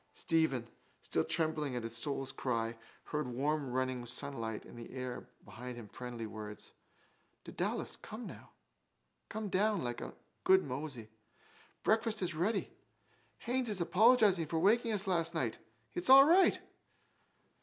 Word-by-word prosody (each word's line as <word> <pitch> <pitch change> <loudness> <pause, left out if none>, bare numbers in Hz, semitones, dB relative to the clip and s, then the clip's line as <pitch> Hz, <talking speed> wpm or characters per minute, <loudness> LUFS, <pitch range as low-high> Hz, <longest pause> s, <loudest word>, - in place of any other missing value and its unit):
Stephen, 160 -8 +1 0.4
still - - +1
trembling 155 -5 -1
at 120 - -3
his 115 0 -5
soul's 135 +2 -3
cry, 115 -4 -1 0.3
heard 150 -3 -2
warm 140 +3 -1
running 130 0 -1
sunlight 120 -4 -4
and 120 - -11
in - - -6
the - - -14
air 130 -1 -5 0.2
behind 125 +2 -8
him 115 -3 -8
friendly 120 0 -6
words. 105 -1 -8 0.7
—Dedalus, - - -2
come - - -8 1.2
down, 205 0 +1
like 120 -1 -3
a - - -7 0.3
good 190 0 +6
mosey. 130 -5 -6 0.7
Breakfast 220 -2 +2
is 180 -1 -1
ready. 195 +6 -1 0.6
Haines 245 0 -1
is 205 -3 -1
apologising 200 -1 +5
for 160 - -1
waking 225 +7 +3
us 210 -1 -1
last 170 -3 +1
night. 125 -8 -1 0.3
It's 175 - -1
all 270 +1 +11
right. 360 +5 +5
150 Hz, 135 wpm, -34 LUFS, 125-190 Hz, 1.2 s, all